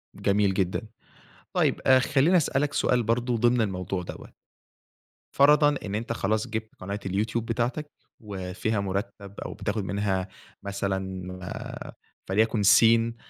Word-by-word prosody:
جميل 100 -1 +2
جدًا، 95 -1 0 0.7
طيّب - - +1
آآ، 130 -1 +7
خلّيني 140 +8 +3
أسألك 145 -2 +1
سؤال 125 -1 +2
برضو 120 +2 0
ضمن 120 +1 +3
الموضوع 95 -3 -2
دَوَّة. - - -9 1.0
فرضًا 145 +1 +5
إن 100 0 -3
أنتَ 115 +2 -2
خلاص 110 +1 -1
جِبت 110 -1 -5
قناة 100 +2 -5
الYouTube 105 +4 -1
بتاعتك، 125 +6 -2 0.3
وفيها 100 +1 -3
مُرتب 100 0 -4
أو - - -5
بتاخد 105 0 -3
منها 95 0 -1 0.4
مَثلًا 95 -2 -3 0.2
آآ، 90 - -7 0.4
فليكن 110 +2 +2
سين 115 +3 +5
105 Hz, 125 wpm, -26 LUFS, 95-120 Hz, 1.0 s, آآ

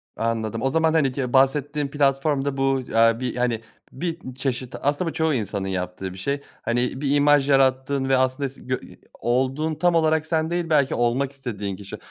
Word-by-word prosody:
Anladım, 115 0 -2
o 135 - +1
zaman, 160 +2 +2
hani, 150 -5 +3
ki 125 -2 -3
bahsettiğin 145 +2 +2
platformda 140 0 +1
bu, 135 0 +2
eee, 115 0 +4
bir, 125 -2 -3
hani, 120 -2 0 0.3
bir 160 -3 -5
çeşit, 130 -2 -3
aslında 145 +5 0
bu - - -7
çoğu 160 -1 +1
insanın 105 -5 -2
yaptığı 90 0 -4
bir - - -11
şey. 140 +9 -2 0.2
Hani, 120 +3 -1
bir 145 -1 +1
imaj 145 -1 +4
yarattığın 135 0 +2
ve 135 - +4
aslında 130 +1 0
se 135 - -17
gö 130 0 -2 0.4
olduğun 135 +6 0
tam 175 +3 +2
olarak 160 -1 +2
sen 160 0 0
değil, 175 -1 -2
belki 145 -4 +3
olmak 120 +3 +1
istediğin 105 -8 -5
kişi. 100 0 -9
135 Hz, 185 wpm, -23 LUFS, 120-145 Hz, 0.4 s, eee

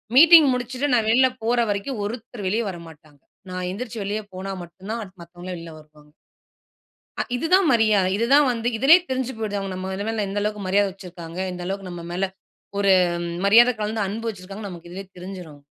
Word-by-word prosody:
Meeting 325 +1 +9
முடிச்சுட்டு 250 +3 -2
நான் 225 -3 +3
வெளியில 260 +3 +5 0.2
போற 240 +1 +2
வரைக்கும் 205 +4 -2
ஒருத்தர் 225 -1 -6
வெளிய 220 +5 0
வரமாட்டாங்க. 160 -5 -12 0.3
நான் 180 0 -4
எந்திரிச்சு 225 +1 -6
வெளிய 210 +2 -2
போனா 190 +1 -5
மட்டும் 185 +4 -12
தான் 230 - -2
அடுத்து 185 -2 -14
மத்தவங்கல்லாம் 175 +1 -8
வெளில 165 -1 -9
வருவாங்க 150 -1 -20 1.1
அ - - +3
இது 255 +7 -2
தான் 380 -1 +6
மரியாத. 215 -5 +3
இது 230 - +1
தான் 290 0 +7
வந்து 235 0 -2
இதிலயே 310 +9 +7
தெரிஞ்சு 260 0 -1
போய்டுது. 205 -2 -2
அவங்க 195 -1 -4 0.3
நல் 220 -2 -1
எந்த 200 +1 -2
அளவுக்கு 210 0 -2
மரியாத 200 +1 +3
வச்சிருக்காங்க. 175 -2 -9
இந்த 180 0 -7
அளவுக்கு 195 0 -4
நம்ம 175 -1 -7
மேல 185 +2 0 0.5
ஒரு 200 -1 +4 0.5
மரியாத 235 +4 +7
கலந்து 215 +1 -2
அன்பு 225 +4 -4
வச்சிருக்காங்க. 195 +1 -8
நமக்கு 175 -1 -10
இதுலயே 190 +2 -8
தெரிஞ்சுரும். 180 -6 -9
200 Hz, 180 wpm, -23 LUFS, 180-230 Hz, 1.1 s, Meeting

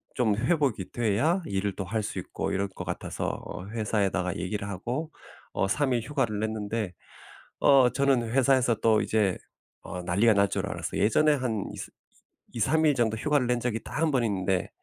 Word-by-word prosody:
좀 115 -5 +2
회복이 130 - 0
돼야 120 - +1
일을 100 0 -2
또 95 - -3
할 110 +4 -1
수 - - -5
있고 - - -4
이럴 100 +1 0
것 95 - -8
같아서 - - -4 0.2
어 90 - -7
회사에다가 100 -4 -1
얘기를 100 +3 -3
하고 120 - -4 0.4
어 95 - +1
3 135 +6 +1
일 120 - +1
휴가를 120 -5 -1
냈는데 110 -2 -2 0.7
어 135 -3 +6
저는 135 -4 +2
회사에서 130 -2 +3
또 110 -1 +3
이제 105 -4 +1 0.4
어 90 +1 -6
난리가 100 +6 +3
날 100 -1 +3
줄 - - -2
알았어요. - - -3
예전에 150 +9 +4
한 115 -6 -2
이ㅅ - - -7 0.6
2-3 155 +8 +2
일 150 - +4
정도 115 -3 +1
휴가를 145 0 +1
낸 125 -1 +1
적이 115 -2 -2
딱 - - -5
1 160 -2 +3
번 130 -3 +2
있는데 95 -3 0
110 Hz, 315 characters per minute, -27 LUFS, 100-130 Hz, 0.7 s, 어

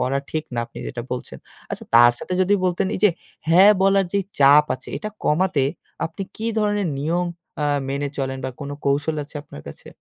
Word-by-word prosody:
করা 130 +2 +1
ঠিক 155 0 -2
না, - - -2
আপনি 115 - -12
যেটা 120 -1 -5
বলছেন। 95 - -6 0.3
আচ্ছা - - -5
তার 120 +1 +8
সাথে - - -6
যদি 185 +2 +3
বলতেন, 180 +1 +1
এইযে 210 - +4 0.4
হ্যাঁ 185 +5 +8
বলার 195 0 +4
যে 200 - +2 0.2
চাপ 140 +2 +7
আছে, 130 - -11
এটা 215 - -4 0.2
কমাতে 155 -2 +2 0.4
আপনি 165 +4 -7
কি 220 - -5
ধরনের 205 -3 +1
নিয়ম 170 +4 0 0.4
আ - - +1 0.2
মেনে 140 +1 -2
চলেন 135 -1 -2
বা, - - -1
কোনো 145 0 -5
কৌশল 145 +3 +1
আছে 145 - -10
আপনার 75 - -12
কাছে? 70 - -11
150 Hz, 190 wpm, -22 LUFS, 135-185 Hz, 0.4 s, তার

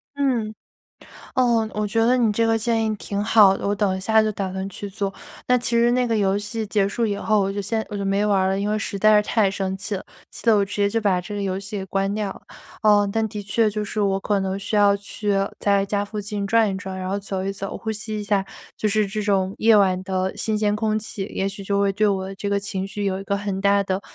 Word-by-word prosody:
嗯， 250 -6 0 0.8
哦， 235 -3 +3
我 210 0 -1
觉 225 +2 +1
得 250 +2 +4
你 235 -3 +3
这 230 +2 +2
个 225 0 +2
建 225 0 0
议 215 - 0
挺 205 0 -3
好 210 -3 +6
的， - - -5
我 200 - +1
等 200 -2 +1
一 - - -4
下 220 +3 +4
就 215 - +1
打 190 -1 -3
算 190 +1 -4
去 200 +1 -7
做。 195 -1 -3 0.3
那 250 - +4
其 240 -1 0
实 235 +1 +4
那 250 0 +2
个 230 -2 0
游 195 -1 +2
戏 215 +2 -4
结 205 -1 +2
束 230 +3 -1
以 205 -2 -1
后， 215 +1 +1
我 195 0 0
就 205 +1 -3
先 220 +2 -2
我 210 - -5
就 200 - -3
没 195 +1 +1
玩 205 -2 +3
儿 190 - +2
了， 195 0 0
因 205 +1 -1
为 215 - +1
实 215 -2 -4
在 215 +1 +6
是 210 0 +3
太 215 -4 +2
生 190 -1 -2
气 200 +2 -4
了， 190 - -6 0.3
气 - - -11
得 225 -2 +5
我 200 - +2
直 200 - -7
接 205 -1 +2
就 225 +2 0
把 195 -4 +1
这 195 +4 -8
个 205 - -3
游 190 -1 -1
戏 195 +1 -6
给 190 - -4
关 195 +1 -1
掉 210 -1 -2
了。 - - -15 0.4
呃， 205 -1 +5
但 225 0 +1
的 205 0 -5
确， 215 +2 +1
就 210 0 -3
是 210 +1 -3
我 195 -1 +1
可 200 0 0
能 190 0 -2
需 200 - -3
要 205 -1 +5
去 205 +1 -4 0.3
在 200 -1 +2
家 200 0 -1
附 210 +1 -5
近 205 0 -4
转 225 +1 +3
一 195 - -2
转， 190 -1 -6
然 185 0 -4
后 195 - -1
走 195 -1 -4
一 195 - -1
走、 195 0 -5
呼 220 - -5
吸 215 0 -4
一 - - -4
下， 200 -1 +1 0.3
就 215 - 0
是 210 0 +2
这 215 +2 -3
种 195 -2 +1
夜 225 0 +5
晚 185 -2 +3
的 190 0 -2
新 215 -1 -1
鲜 210 -1 +1
空 215 0 0
气。 210 -2 -5
也 195 - -1
许 195 0 -6
就 200 +1 0
会 200 -1 +2
对 210 +2 +2
我 195 -1 -1
这 200 +1 -4
个 200 0 +1
情 195 -1 -4
绪 200 +1 -4
有 190 0 -1
一 - - -8
个 200 0 -1
很 200 -1 -3
大 200 0 +4
的 190 0 -2
205 Hz, 300 characters per minute, -23 LUFS, 195-215 Hz, 0.8 s, 好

